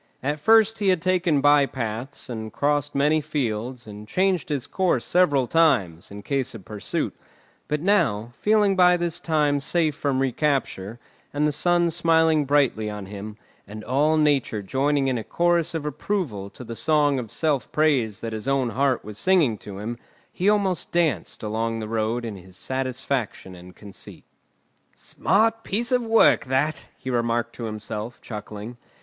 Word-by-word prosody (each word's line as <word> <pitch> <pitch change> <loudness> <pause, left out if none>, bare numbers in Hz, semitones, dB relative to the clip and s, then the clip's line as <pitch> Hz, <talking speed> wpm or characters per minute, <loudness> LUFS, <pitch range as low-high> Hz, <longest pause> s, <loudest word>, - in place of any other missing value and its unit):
At 145 +3 -1
first 225 +5 +4
he 205 - 0
had 185 -2 +3
taken 175 -4 +1
by 145 -1 +5
paths, 120 +2 -5
and 110 -3 -6
crossed 145 +3 0
many 150 +3 +3
fields, 125 -4 -3
and 105 0 -10
changed 185 - 0
his 140 -4 -2
course 185 -2 0
several 145 -8 +3
times, 115 - +2
in 100 0 -9
case 135 -2 -2
of 100 -5 -11
pursuit; 105 0 -3 0.5
but 150 0 -1
now, 150 - +1
feeling 210 -2 +3
by 180 -1 +5
this 175 0 -2
time 150 -4 +1
safe 155 +2 0
from 140 -3 -1
recapture, 130 -6 -1 0.3
and 145 +1 0
the 150 - +2
sun 175 +2 +2
smiling 160 -2 +3
brightly 135 -7 +2
on 105 -1 -6
him, 105 +2 -8 0.3
and 110 +2 -9
all 150 +6 +2
Nature 140 -8 +1
joining 135 +5 +1
in 130 -3 0
a - - -6
chorus 170 +2 +1
of 155 -2 -3
approval 145 - -3
to 125 - -11
the 115 -1 -7
song 145 0 +2
of 115 -3 -6
self 150 -2 -1
praise 135 -10 +1
that 115 -1 -4
his 110 +3 -5
own 135 -3 +1
heart 130 +2 0
was 105 0 -8
singing 170 -10 +3
to 100 -2 -9
him, 115 +4 -5 0.3
he 190 +3 +1
almost 200 -4 0
danced 155 - -1
along 115 +1 -2
the 110 - -5
road 115 +2 -1
in 110 -3 -6
his 95 0 -14
satisfaction 130 -6 -3
and 90 0 -13
conceit. 100 -2 -12 0.7
"Smart 225 +3 +1
piece 235 +5 -1
of 250 -1 +3
work 225 -1 +4
that!" 135 +4 -1
he 130 - -5
remarked 120 -1 0
to 115 - -6
himself 110 +1 -5
chuckling. 105 +1 -8
135 Hz, 165 wpm, -24 LUFS, 110-160 Hz, 0.7 s, by